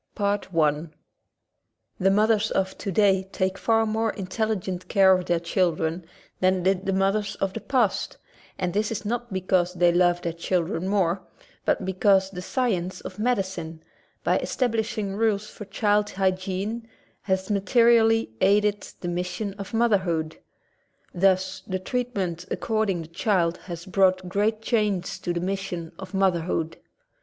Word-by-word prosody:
Rome, 205 0 +1
Italy 155 -2 0 1.1
The 190 - +3
mothers 215 +2 +3
of 190 0 -1
today 195 -1 +1
take 190 0 0
far 225 -1 +3
more 220 +1 0
intelli 215 +2 -2
gent 180 -1 -5
care 190 -1 +5
of 180 -1 -2
their 175 -1 +2
children 170 -1 0 0.3
than 185 -1 +2
did 190 0 +1
the - - +2
mothers 195 +2 +1
of 195 -1 -2
the - - -5
past, 245 -7 0 0.4
and 180 -2 -2
this 210 +2 0
is 220 -1 -4
not 240 +2 -3
because 185 -1 +1
they 175 0 +4
love 175 0 +2
their 170 - -2
children 170 +1 -1
more 190 -2 +1 0.4
but 190 - +1
because 190 0 +3
the 180 -2 -6
science 190 -5 -1
of 185 - -9
medicine, 190 -8 -2 0.4
by - - +2
establishing 220 -5 -1
rules 215 -1 +1
for 210 - -9
child 205 +1 +1
hygiene, 190 +4 -2 0.3
has 190 +1 -1
materially 225 - +4
aided 205 +1 +3 0.2
the 175 - -4
mis 175 +1 -1
sion 200 +1 -4
of 195 - -6
motherhood. 185 -9 +1 0.8
Thus 190 +1 +2
the 185 - -1
treatment 190 -5 -3
ac - - -1
corded 215 -6 0
the - - -11
child 170 -1 +1
has 170 -1 -7
brought 185 -1 +2
great 210 +4 0
change 210 -6 0
to 175 - -2
the 170 0 -2
mission 185 -3 -3
of 190 0 -7
motherhood. 170 -4 0
190 Hz, 150 wpm, -25 LUFS, 180-210 Hz, 1.1 s, care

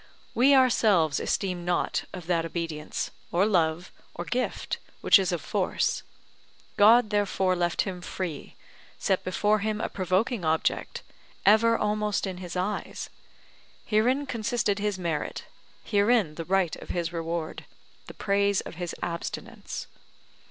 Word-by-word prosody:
We 270 +4 +5
ourselves 210 - +4
esteem 180 -3 -1
not 175 0 0
of 180 -3 -8
that 170 -1 +1
obedience, 165 -2 -4 0.2
or 180 +3 +3
love, 175 -4 +1 0.2
or 175 - -5
gift, 250 +5 -2 0.2
which - - +7
is 185 -2 0
of 175 - -2
force: 205 -3 0 0.7
God 220 +2 +6
therefore 195 -2 +1
left 175 -1 +1
him 185 -3 -5
free, 175 -4 -5 0.4
set 190 - 0
before 210 +3 +1
him 215 +1 -1
a - - -2
provoking 190 +3 0
object, 160 0 0 0.4
ever 225 +3 +5
almost 210 -1 0
in 190 -2 -4
his 180 -1 -7
eyes; 190 +3 -3 0.7
herein 250 +7 +2
consisted 230 -4 -1
his 205 -1 -1
merit, 170 -4 -3 0.4
herein 205 -5 +2
the 165 +1 -6
right 185 -2 +1
of - - -12
his 170 -1 -2
reward, 165 -1 -4 0.4
the - - -10
praise 200 -1 +2
of - - -10
his 175 - -3
abstinence. 170 -1 -5
190 Hz, 135 wpm, -27 LUFS, 175-210 Hz, 0.7 s, which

